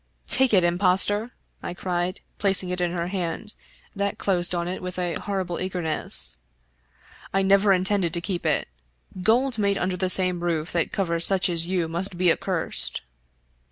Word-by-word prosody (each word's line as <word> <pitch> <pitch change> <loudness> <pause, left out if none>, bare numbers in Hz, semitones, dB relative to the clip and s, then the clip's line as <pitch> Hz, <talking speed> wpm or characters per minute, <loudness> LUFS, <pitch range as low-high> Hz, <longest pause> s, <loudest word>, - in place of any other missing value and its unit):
" - - -44
Take 265 -1 +4
it, 190 -4 +4
impostor! 190 +5 +3 0.2
" - - -44
I 175 - -6
cried, 180 +1 -3 0.2
placing 195 -3 +2
it 180 0 -2
in 175 -1 0
her 175 0 -3
hand, 190 +3 -3 0.4
that 200 0 -2
closed 180 -2 +2
on 170 0 -2
it 185 - -4
with 180 0 -6
a 175 -2 -1
horrible 190 -4 -3
eagerness. 160 - -1 0.4
" - - -24
I 195 - +3
never 195 +1 +4
intended 190 -1 +1
to - - 0
keep 180 0 -4
it. 155 -3 0 0.5
Gold 235 +4 +3
made 200 -1 +1
under 180 0 -1
the 185 0 0
same 180 -2 +3
roof 165 -2 -1
that 170 -2 -1
covers 170 -3 0
such 190 -1 +2
as 170 -1 +3
you 180 -3 0
must 175 +3 -3
be 180 -1 +4
accursed." 165 - -1
180 Hz, 180 wpm, -24 LUFS, 175-195 Hz, 0.5 s, Take